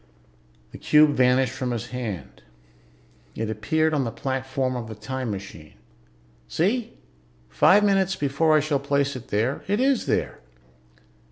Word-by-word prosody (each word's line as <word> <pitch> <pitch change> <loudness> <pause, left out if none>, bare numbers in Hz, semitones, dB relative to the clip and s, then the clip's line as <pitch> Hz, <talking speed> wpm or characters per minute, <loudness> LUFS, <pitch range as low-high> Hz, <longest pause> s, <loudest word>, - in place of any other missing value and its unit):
The - - -11
cube 150 0 +5
vanished 130 -1 +2
from 130 -1 -3
his 120 -1 -4
hand. 115 -8 -6 0.9
It 110 0 -3
appeared 155 +9 0
on 145 -3 +1
the 120 - -2
platform 130 +1 -2
of 120 -2 -5
the 110 - -8
time 130 +3 -5
machine. 95 -6 -8 0.7
"See? 215 +8 -1 0.6
Five 185 - +5
minutes 195 -2 +2
before 155 +2 +2
I - - +3
shall 145 -1 0
place 140 0 0
it 125 -1 -9
there, 115 +7 -1
it 205 +3 0
is 265 -1 +1
there!" - - -1
135 Hz, 145 wpm, -24 LUFS, 120-155 Hz, 0.9 s, cube